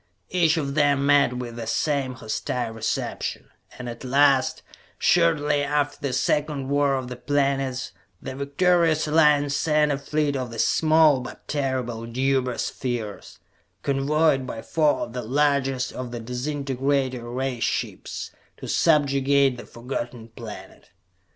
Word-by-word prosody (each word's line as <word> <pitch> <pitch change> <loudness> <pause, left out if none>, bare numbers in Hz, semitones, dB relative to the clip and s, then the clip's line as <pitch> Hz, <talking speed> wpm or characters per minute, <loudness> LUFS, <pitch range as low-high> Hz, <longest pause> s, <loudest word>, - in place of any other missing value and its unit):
Each 170 -2 +3
of 140 -3 -2
them 145 -2 +2
met 140 -3 +4
with 120 -2 -6
the 115 -1 -5
same 135 +1 0
hostile 125 0 -3
reception, 110 0 -3 0.3
and 125 - -7
at 120 +1 -7
last, 135 0 +3 0.3
shortly 150 -4 +3
after 145 0 0
the 140 - -1
second 145 0 0
War 140 -1 +2
of 130 -1 -3
the 125 - -6
Planets, 135 -1 -1 0.3
the - - -6
victorious 155 +3 +2
Alliance 150 -2 +4
sent 150 0 +2
a 140 - -1
fleet 145 0 -1
of 130 -2 -3
the 115 - -8
small 155 +2 +4
but 130 - -10
terrible 130 -5 -2
Deuber 130 0 0
Spheres, 120 -5 -4 0.5
convoyed 140 0 +2
by 115 - -6
four 155 -2 +1
of 115 - -5
the 125 - -3
largest 135 0 +1
of 125 -1 -5
the 120 0 -6
disintegrator 130 0 -2
ray 130 0 -2
ships, 115 - -3 0.3
to - - -8
subjugate 140 -3 +3
the 120 - -10
Forgotten 120 -1 -6
Planet. 110 -2 -11
135 Hz, 140 wpm, -24 LUFS, 125-145 Hz, 0.5 s, met